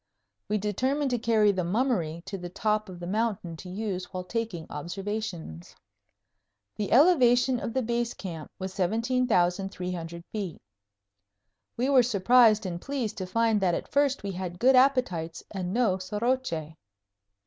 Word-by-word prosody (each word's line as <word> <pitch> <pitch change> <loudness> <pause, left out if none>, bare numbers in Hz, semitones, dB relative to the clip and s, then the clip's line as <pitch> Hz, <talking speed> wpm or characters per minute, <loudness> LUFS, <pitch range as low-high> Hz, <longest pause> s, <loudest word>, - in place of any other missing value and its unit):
We 210 - +1
determined 260 +8 0
to 245 - 0
carry 220 -2 +3
the 185 -2 -1
"Mummery" 175 -5 0
to 195 - -5
the 180 -2 -6
top 215 +2 -1
of 180 -2 -9
the 175 - -6
mountain 195 -3 -1
to 180 - -9
use 190 -1 -3
while 185 0 -6
taking 190 -4 -4
observations. 175 - -5 1.0
The 205 -2 -3
elevation 255 -4 +5
of 230 - -4
the 260 - +1
Base 235 +1 -1
Camp 165 -5 -7
was 190 0 -5
17,300 185 -5 0
feet. 195 -7 -4 1.2
We 250 +3 +1
were 275 -2 +6
surprised 225 -1 +4
and 175 -2 -4
pleased 270 -6 -3
to 185 - -4
find 225 +1 +2
that 180 -3 +2
at - - -6
first 280 -3 +2
we 200 - -3
had 180 -1 -5
good 260 +6 +5
appetites 250 -12 +2
and 185 -3 -3
no 210 -4 +2
soroche. 205 -5 -2
205 Hz, 150 wpm, -27 LUFS, 180-240 Hz, 1.2 s, were